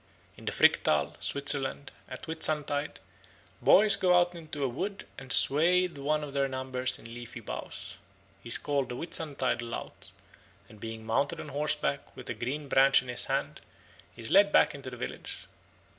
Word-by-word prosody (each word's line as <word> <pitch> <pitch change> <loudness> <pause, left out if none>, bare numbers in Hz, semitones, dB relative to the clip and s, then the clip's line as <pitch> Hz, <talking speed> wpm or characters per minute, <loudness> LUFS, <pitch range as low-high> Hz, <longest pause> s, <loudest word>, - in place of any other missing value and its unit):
In - - -14
the - - -1
Fricktal, 75 -1 +3
Switzerland, 140 -1 -1 0.2
at - - -8
Whitsuntide 150 -2 -2 0.6
boys 205 0 +6
go 180 -2 +3
out 175 0 +1
into 155 -4 -6
a - - +2
wood 190 +11 -4
and 130 -2 -8
swathe 175 +5 +5
one 150 +2 -1
of 145 -2 -7
their 140 -1 +1
number 130 -1 -5
in 115 0 -11
leafy 120 0 -8
boughs. 115 - -7 0.4
He 120 - -10
is - - +4
called 140 -2 -1
the 125 - -4
Whitsuntide 140 -5 -2
lout, 115 0 -7 0.6
and 110 - -16
being 110 0 -7
mounted 115 +6 0
on - - -7
horseback 150 +2 -1
with - - -7
a - - -1
green 140 +5 -4
branch 135 -1 +5
in 125 - -11
his 125 - -1
hand - - -2 0.5
he 115 - -10
is 110 - -6
led 200 +1 +6
back - - +4
into 140 -2 -8
the 125 - -9
village. 100 -4 -7
140 Hz, 175 wpm, -29 LUFS, 125-155 Hz, 0.6 s, boys